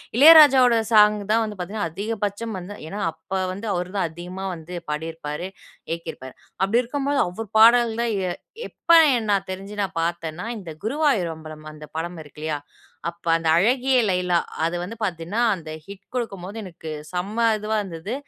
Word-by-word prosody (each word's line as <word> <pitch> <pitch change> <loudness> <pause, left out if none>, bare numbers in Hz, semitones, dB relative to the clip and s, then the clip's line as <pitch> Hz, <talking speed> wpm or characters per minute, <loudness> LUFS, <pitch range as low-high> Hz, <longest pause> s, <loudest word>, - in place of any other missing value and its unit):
இளையராஜாவோட 275 -4 +8 0.2
சாங் 210 -1 +7 0.2
தான் 225 +1 +4
வந்து 215 -1 -5
பாத்தீங்கன்னா, 190 +1 -3
அதிகபட்சம் 210 +3 -3
வந்து 180 +3 -8
ஏன்னா, 200 +5 -6
அப்ப 165 +4 -6
வந்து 200 +4 -7
அவரு 180 0 -2
தான் 190 -4 +1
அதிகமா 175 +4 -8
வந்து 165 +2 -10 0.2
பாடிருப்பாரு. 160 +1 -4 0.4
இயக்கிருப்பாரு. 160 -6 -6 0.3
அப்படி 200 +5 +3
இருக்கும் 275 +3 -3
போது 285 0 +1
அவரு 215 +5 -6
பாடல் 235 +1 +6
தான் 235 -1 0 0.2
எ - - -1 0.4
எப்ப - - -2 0.2
என் 225 -2 -2
நான் 195 -1 +1
தெரிஞ்சு 195 +2 -7
நான் 190 -4 -5
பார்த்தன்னா, 170 +1 -3
இந்த 185 -5 -9
குருவாயூர் 230 - +1
அம்பலம் 155 -1 -11
அந்த 150 0 -10
படம் 170 +1 -4
இருக்கு 150 0 -14
இல்லயா? 155 -2 -2 0.5
அப்ப 170 0 -15
அந்த 165 0 -4
"அழகிய 255 +7 +3
லைலா" 180 -2 +2 0.3
அது 170 +1 -1
வந்து 200 +6 -6
பார்த்தீங்கன்னா, 180 +2 -2 0.2
அந்த 165 -3 -10 0.2
ஹிட் 200 -1 -11
கொடுக்கும்போது 200 -4 -4
எனக்கு 165 -4 -9 0.2
செம்ம 200 +6 -1
இதுவா 215 +1 -1
இருந்தது. 180 +3 -6
190 Hz, 165 wpm, -23 LUFS, 170-225 Hz, 0.5 s, இளையராஜாவோட